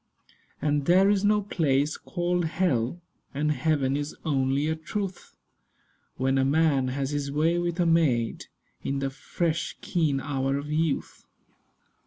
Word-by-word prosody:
And 145 -1 0
there 190 +3 +5
is 200 -1 +1
no 210 0 +3
place 150 -6 +1
called 175 -1 -1
hell; 160 -3 0 0.3
And 150 +2 +1
heaven 145 -3 +1
is 145 +1 -3
only 135 -1 +1
a 160 - 0
truth 190 +3 -5 0.8
When 135 +1 +1
a - - +3
man 140 -1 +2
has 135 +2 -2
his 145 -1 -2
way 160 +4 +2
with 175 0 -2
a 175 - +3
maid, 150 -9 +1 0.4
In 140 - -1
the 135 0 -2
fresh 165 +4 -2
keen 155 -6 0
hour 135 0 -1
of 145 +1 -5
youth. 155 -1 -1
150 Hz, 145 wpm, -27 LUFS, 135-170 Hz, 0.8 s, there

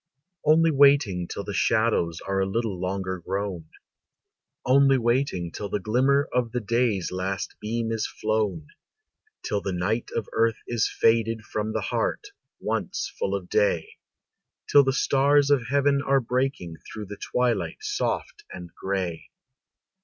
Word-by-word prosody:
"] 180 -3 -32
Only 165 +1 +5
waiting 140 - +4
till 100 - -5
the 100 - -5
shadows 110 -7 +1
Are 95 0 -2
a 95 - +1
little 110 -3 -2
longer 95 0 -2
grown, 95 -1 -4 1.0
Only 135 +1 +5
waiting 120 -8 0
till 100 +4 -5
the 105 - -1
glimmer 130 +8 +2
Of 120 -2 0
the 125 - 0
day's 115 -4 0
last 95 +1 -3
beam 115 +1 -2
is 110 -1 -1
flown; 105 -8 -2 0.7
Till 105 - -1
the 95 - -3
night 105 +7 -1
of 110 - -2
earth 115 0 +2
is 115 -2 0
faded 115 0 +2
From 110 0 -3
the 110 - -1
heart, 120 - -2 0.3
once - - -3
full 480 - 0
of - - -5
day; 475 -1 0 0.7
Till 145 - +6
the 135 - +1
stars 140 +1 +3
of 130 -5 +2
heaven 140 0 +2
are 140 -1 +2
breaking 125 -9 -2
Through 105 +5 -9
the 105 +1 -9
twilight 125 -2 0
soft 420 +1 -3
and 85 -1 -9
gray. 95 -4 -3
115 Hz, 150 wpm, -25 LUFS, 95-135 Hz, 1.0 s, Till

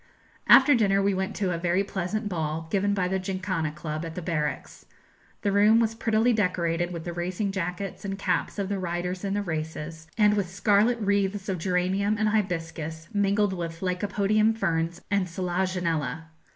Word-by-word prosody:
After 290 - +8
dinner 200 -5 +3
we 200 0 +2
went 190 +2 -2
to 190 -3 0
a 170 - -3
very 175 +3 +1
pleasant 200 +3 -3
ball, 160 -3 -3
given 200 0 +1
by 185 -2 +1
the 190 +1 0
Jinkhana 185 -5 -2
Club, 155 -1 -4
at 165 -1 -6
the 180 - -4
barracks. 155 -4 -3 0.6
The 200 - +2
room 210 +3 +5
was 225 -1 +1
prettily 225 +1 +2
decorated 175 -4 0
with 170 -2 -5
the 175 - -5
racing 180 +4 -2
jackets 185 0 -4
and 195 -1 -3
caps 200 - -1
of 200 -2 -1
the 200 0 -2
riders 180 +1 -3
in 200 0 -1
the 205 - 0
races, 160 -1 -5
and 210 -1 +5
with 200 -4 0
scarlet 205 +5 +3
wreaths 200 -1 0
of 185 -2 -1
geranium 190 +4 +1
and 215 0 +2
hibiscus 165 -5 -2
mingled 205 0 +2
with 165 -2 -5
lycopodium 205 +4 +1
ferns 165 -3 -1
and 200 -2 +2
selaginella. 175 -4 -1
185 Hz, 175 wpm, -26 LUFS, 170-205 Hz, 0.6 s, After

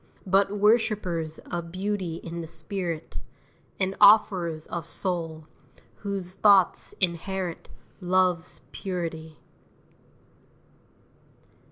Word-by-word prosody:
But 195 +2 +2
worshippers 205 -7 +1
of 170 -1 -4
beauty 190 -2 -2
in 170 0 -6
the 165 - -7
spirit, 175 -3 -2 0.6
And 190 0 0
offerers 185 -6 +5
of 170 - -5
soul, 165 -4 -2 0.5
whose 195 -3 -3
thoughts 195 -2 +4
inherit 180 0 -2 0.3
Love's 180 -2 +1
purity. 165 -4 -5
180 Hz, 80 wpm, -26 LUFS, 165-195 Hz, 0.6 s, offerers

